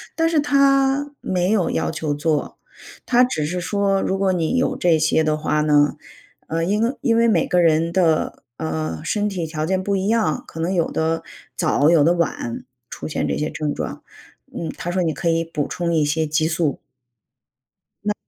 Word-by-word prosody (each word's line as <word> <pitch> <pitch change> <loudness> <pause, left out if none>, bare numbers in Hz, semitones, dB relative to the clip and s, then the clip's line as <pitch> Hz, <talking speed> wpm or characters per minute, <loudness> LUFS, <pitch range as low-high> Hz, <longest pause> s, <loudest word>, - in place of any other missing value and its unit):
但 325 0 +2
是 320 - +2
他 275 0 +3
没 180 +1 0
有 200 -6 +2
要 80 -1 -1
求 155 -2 -2
做， 150 +1 -1 0.5
他 250 0 +4
只 155 -12 0
是 175 +4 -2
说 195 0 +1
如 190 - -1
果 195 -1 +1
你 175 +6 0
有 255 - +1
这 170 -2 +3
些 155 +1 +2
的 155 0 +1
话 150 0 0
呢， 145 -1 +3 0.5
呃， 165 +1 -1
因 205 +5 0
为 240 +4 0
因 230 -4 +2
为 235 - +4
每 190 -8 +3
个 180 -1 +2
人 165 0 +3
的， 170 -4 +1
呃， 80 0 -3
身 210 -1 0
体 180 -4 -3
条 155 -1 -3
件 185 +2 0
不 200 +1 0
一 190 - -1
样， 220 -8 +1
可 165 - -10
能 180 +3 0
有 170 -3 +1
的 160 +1 -1 0.3
早、 155 -3 +2
有 155 -4 +5
的 170 - +4
晚 165 -8 -2 0.3
出 - - -7
现 155 - -2
这 - - -1
些 150 - -1
症 150 -2 -2
状， - - -5 0.5
嗯， 165 - -4
他 175 - -4
说 185 0 0
你 160 - 0
可 165 +4 -1
以 165 0 +1
补 150 -3 -3
充 170 -1 -2
一 155 -2 +3
些 160 +2 0
激 155 +1 +1
素。 160 -3 -1 1.2
那 210 - 0
165 Hz, 215 characters per minute, -21 LUFS, 155-195 Hz, 1.2 s, 有